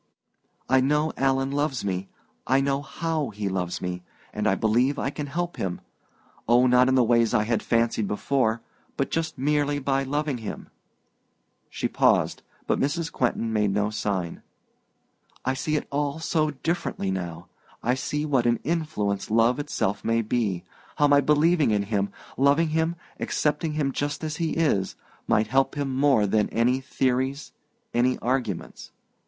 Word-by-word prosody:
I 130 0 +4
know 150 +4 +1
Alan 135 0 +1
loves 140 -5 -1
me 95 0 -2 0.4
I 135 +1 +4
know 135 0 0
how 155 +1 -2
he 105 -1 -4
loves 90 -2 -2
me 90 0 -3 0.3
and - - -1
I - - +3
believe 125 +6 +2
I 135 - -1
can 145 -1 -5
help 175 +4 -3
him 90 -2 -3 0.7
oh, 120 +2 +5
not 125 0 +5
in 130 - +3
the 130 - +5
ways 115 -1 +3
I 105 - +3
had 115 0 0
fancied 115 -2 +1
before 115 +1 0 0.3
but 135 - -1
just 165 -1 -2
merely 145 +1 +1
by 135 -1 0
loving 145 -1 -1
him." 110 - -7 1.0
She - - -2
paused, - - +2 0.2
but - - +1
Mrs. 160 +4 -1
Quentin 115 -4 -1
made 105 -2 +2
no 105 +1 0
sign. 100 -5 -2 1.0
"I 130 - +1
see 150 +3 -1
it 150 - -1
all 145 +1 -1
so 160 -1 0
differently 150 - -2
now. 85 -2 -5 0.4
I 125 - +2
see 150 +3 -2
what 135 -5 +2
an 120 -1 +2
influence 150 -11 -1
love 115 +4 +3
itself 145 -9 -2
may 115 0 +1
be 105 -5 -1 0.3
how 145 - +4
my 145 0 +5
believing 150 +2 +3
in 105 -2 +2
him, 100 -1 -1 0.3
loving 140 +5 +3
him, 160 +2 0 0.2
accepting 150 +1 0
him 145 -3 0
just 145 +3 -3
as 155 -1 -3
he 165 -2 -1
is, 125 -13 +1 0.3
might 110 - +3
help 135 +6 +1
him 140 -2 -2
more 135 -6 +4
than 105 +1 +1
any 120 +3 +2
theories, 130 +1 -1 0.4
any 125 +2 +2
arguments. 130 +1 -3
130 Hz, 160 wpm, -25 LUFS, 110-145 Hz, 1.0 s, oh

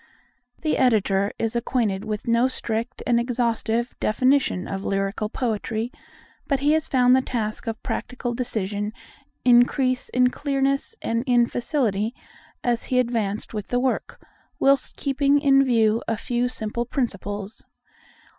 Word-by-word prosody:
The 310 - 0
Editor 200 -5 +2
is 225 +1 -2
acquainted 225 -5 0
with 215 +1 -4
no 235 +2 +4
strict 235 -1 -3
and 240 -1 +3
exhaustive 235 -1 -1
definition 255 -4 +2
of 195 0 -4
lyrical 195 +2 -1
poetry, 225 -1 -2 0.6
but 275 -2 0
he 290 +1 +3
has 315 0 +2
found 250 -1 +4
the 260 - +4
task 225 -3 -3
of 225 0 -4
practical 245 -1 -3
decision 210 -4 -2 0.5
increase 250 +1 +3
in 250 0 +3
clearness 275 - -1
and 230 +1 0
in 240 -1 +5
facility 235 -4 -1 0.5
as 240 -1 0
he 255 - 0
advanced 230 -5 -1
with 210 -2 -4
the 245 - 0
work, 260 0 -1 0.4
whilst 275 0 +2
keeping 280 +1 +2
in 275 -1 +5
view 230 -3 +3
a 225 - 0
few 245 +3 -1
simple 235 -1 -3
principles. 205 -4 -4
240 Hz, 135 wpm, -24 LUFS, 215-255 Hz, 0.6 s, in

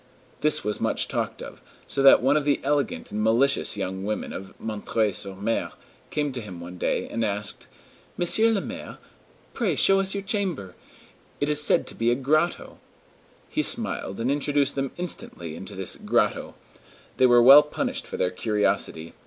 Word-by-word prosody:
This 150 +1 +3
was 105 0 -3
much - - 0
talked - - -3
of, - - -11 0.2
so 140 - -1
that 135 -2 +7
one 135 +3 +3
of 150 - +2
the 145 0 +1
elegant 145 -1 -1
and 105 - -2
malicious 115 +1 +2
young 95 -1 -4
women 105 +1 -3
of 95 - -9
M. 110 -2 -5 0.3
sur 100 +1 -1
M. 115 - 0 0.4
came 145 -2 -1
to 125 -2 -5
him 95 -5 -9
one 90 +1 -9
day, - - -1
and 115 - -3
asked: 105 -1 -2 0.5
"Monsieur 220 +6 +3
le 205 -3 0
Maire, 265 +7 -8 0.6
pray 205 - 0
show 195 +7 +4
us 195 0 -1
your 200 - -3
chamber. 190 - -2 0.7
It 145 - 0
is 150 0 +3
said - - +3
to - - -7
be 115 +1 0
a 120 - +3
grotto." 155 +6 -1 0.7
He - - -1
smiled, 95 - -2
and 120 +4 0
introduced 145 0 +1
them 135 -1 -2
instantly 90 - -5
into 95 +4 -8
this 95 -1 -3
"grotto." - - 0 0.6
They 130 - +5
were 120 -1 +6
well 135 +4 +10
punished 150 - -4
for - - -6
their 90 - 0
curiosity. 95 -5 -1
130 Hz, 180 wpm, -25 LUFS, 105-150 Hz, 0.7 s, well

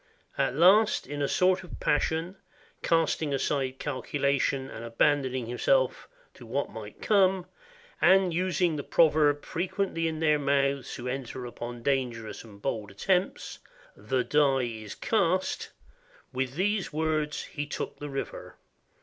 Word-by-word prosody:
At - - 0
last, 195 +7 +5
in 145 0 -5
a 140 - +1
sort 185 +3 +2
of 180 - -10
passion, 160 +5 0 0.4
casting 160 -3 +1
aside 135 -1 -1
calculation 140 -1 -1
and 115 - -8
abandoning 130 +1 +1
himself - - +1 0.2
to - - -14
what - - -2
might - - -9
come, 190 -3 +3 0.6
and 190 -2 +5
using 175 -2 +1
the 145 - -4
proverb 150 -3 +3
fre - - -6
quently 185 -3 -1
in 160 -1 -3
their 150 -2 +3
mouths 140 -1 0
who 125 - -6
enter 130 -1 -4
upon 120 0 -7
dangerous 120 -5 -2
and 105 -3 -14
bold 110 -6 -2
attempts, 180 - -1 0.4
"The 125 +4 -1
die 140 -3 +3
is 110 -3 -6
cast," 190 -4 0 0.6
with 130 0 -2
these 200 +2 0
words 155 -1 -1
he 145 0 -5
took - - -5
the 145 - -6
river. 135 0 -6
145 Hz, 140 wpm, -28 LUFS, 130-170 Hz, 0.6 s, last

